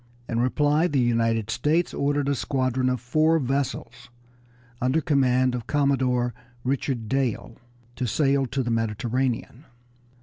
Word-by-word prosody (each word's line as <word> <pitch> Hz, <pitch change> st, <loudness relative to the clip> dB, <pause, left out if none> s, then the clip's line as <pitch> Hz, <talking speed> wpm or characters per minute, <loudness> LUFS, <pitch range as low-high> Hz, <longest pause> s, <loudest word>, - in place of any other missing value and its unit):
In 115 Hz, -, -1 dB
reply 145 Hz, +6 st, +2 dB
the 145 Hz, -5 st, 0 dB
United 115 Hz, -2 st, +1 dB
States 160 Hz, +8 st, +1 dB
ordered 145 Hz, 0 st, 0 dB
a 140 Hz, -, +2 dB
squadron 130 Hz, -1 st, 0 dB
of 125 Hz, -1 st, -1 dB
four 155 Hz, +7 st, +2 dB
vessels 125 Hz, -3 st, -3 dB, 0.7 s
under 130 Hz, +5 st, +2 dB
command 130 Hz, -4 st, +2 dB
of 120 Hz, -2 st, -5 dB
Commodore 130 Hz, -4 st, +1 dB, 0.3 s
Richard 130 Hz, -3 st, -2 dB
Dale 130 Hz, -2 st, -1 dB, 0.4 s
to 125 Hz, -, -1 dB
sail 135 Hz, +2 st, +1 dB
to 135 Hz, +2 st, -2 dB
the 120 Hz, -, -2 dB
Mediterranean. 115 Hz, +4 st, -2 dB
130 Hz, 130 wpm, -25 LUFS, 120-140 Hz, 0.7 s, reply